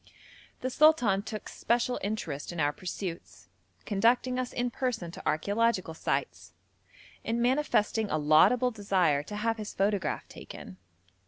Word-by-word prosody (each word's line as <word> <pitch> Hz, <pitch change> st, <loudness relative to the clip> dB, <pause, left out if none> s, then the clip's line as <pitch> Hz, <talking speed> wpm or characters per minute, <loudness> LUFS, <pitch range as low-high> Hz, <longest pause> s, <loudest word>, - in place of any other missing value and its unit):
The 255 Hz, -, -2 dB
sultan 250 Hz, -11 st, +4 dB
took 215 Hz, 0 st, -7 dB
special 240 Hz, +1 st, 0 dB
interest 185 Hz, -9 st, -4 dB
in 175 Hz, -, -6 dB
our 145 Hz, -1 st, +2 dB
pursuits, 180 Hz, 0 st, -7 dB, 0.4 s
conducting 240 Hz, +5 st, +2 dB
us 255 Hz, -1 st, -3 dB
in 245 Hz, 0 st, -2 dB
person 225 Hz, -10 st, -3 dB
to -, -, -9 dB
archæological 200 Hz, +1 st, 0 dB
sites, -, -, -3 dB, 0.7 s
and 230 Hz, +1 st, -1 dB
manifesting 235 Hz, -4 st, +1 dB
a -, -, 0 dB
laudable 155 Hz, +12 st, +4 dB
desire 190 Hz, -9 st, +1 dB
to 205 Hz, +8 st, -8 dB
have 225 Hz, +2 st, -1 dB
his 215 Hz, -1 st, -7 dB
photograph 195 Hz, -3 st, 0 dB
taken. 90 Hz, -, -11 dB
210 Hz, 135 wpm, -29 LUFS, 175-240 Hz, 0.7 s, sultan